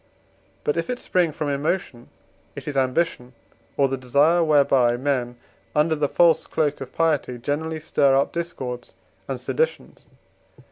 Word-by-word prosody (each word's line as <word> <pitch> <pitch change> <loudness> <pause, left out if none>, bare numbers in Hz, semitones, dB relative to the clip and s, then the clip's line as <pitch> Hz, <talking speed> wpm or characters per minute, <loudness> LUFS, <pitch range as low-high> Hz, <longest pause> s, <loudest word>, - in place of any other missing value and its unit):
But, 150 - 0
if 165 - -2
it 250 - -1
spring 180 -8 +1
from 150 0 -3
emotion, 140 -3 -2 0.5
it - - -9
is 145 - -4
ambition, 130 -1 0 0.4
or 140 - +4
the 135 0 -2
desire 145 +7 +3
whereby, 135 -6 +3
men, 125 -2 -1 0.4
under 150 +2 +3
the 145 -2 0
false 165 -2 +3
cloak 150 -3 -1
of 130 -1 -7
piety, 155 -6 0
generally 155 +5 -3
stir 140 -3 +2
up 140 - 0
discords 130 -8 -5 0.3
and - - -4
seditions. 475 +1 -3
145 Hz, 145 wpm, -23 LUFS, 130-160 Hz, 0.5 s, or